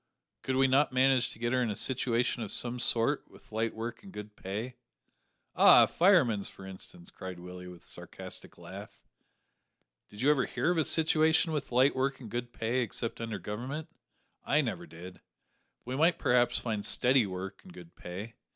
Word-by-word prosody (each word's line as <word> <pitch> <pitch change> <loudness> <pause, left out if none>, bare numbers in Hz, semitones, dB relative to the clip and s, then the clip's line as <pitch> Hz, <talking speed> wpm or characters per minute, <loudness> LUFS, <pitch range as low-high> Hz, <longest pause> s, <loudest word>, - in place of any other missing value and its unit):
"Could 130 - -2
we 135 +1 +4
not 135 +2 +3
manage 130 -1 +3
to - - -9
get 120 +2 -1
her 130 - +2
a 110 -4 -1
situation 120 0 +1
of 110 - -3
some 125 0 -2
sort 115 -1 +2
with - - -19
light 110 +1 -1
work 115 +2 -5
and 200 -1 -12
good 105 - -9
pay?" 110 +6 -5 0.8
"Ah! - - +8
a - - +3
fireman's, 140 - +3
for 95 - -12
instance," 175 - -9
cried 95 - -8
Willie, 90 0 -9
with 90 -1 -12
a - - -22
sarcastic - - -8
laugh; - - -10 1.1
"did 105 - -10
you 145 +3 +5
ever 140 -4 +1
hear - - 0
of 175 - +1
a 155 - +2
situation 160 +1 +3
with 150 -4 -3
light 130 +3 +4
work 135 +1 -1
and 115 -6 -10
good 120 +1 -4
pay 115 +3 -1
except 115 0 -3
under 115 -2 -3
Government? 125 +11 -5 0.5
I - - +2
never - - -4
did; 90 +3 -11 0.6
but - - -45
we 125 +2 -4
might 165 +4 +3
perhaps 125 -4 +2
find 110 -3 -3
steady 125 -1 +3
work 95 +1 -6
and 185 - -14
good 170 -1 -13
pay. 100 +6 -8
120 Hz, 190 wpm, -30 LUFS, 105-135 Hz, 1.1 s, Ah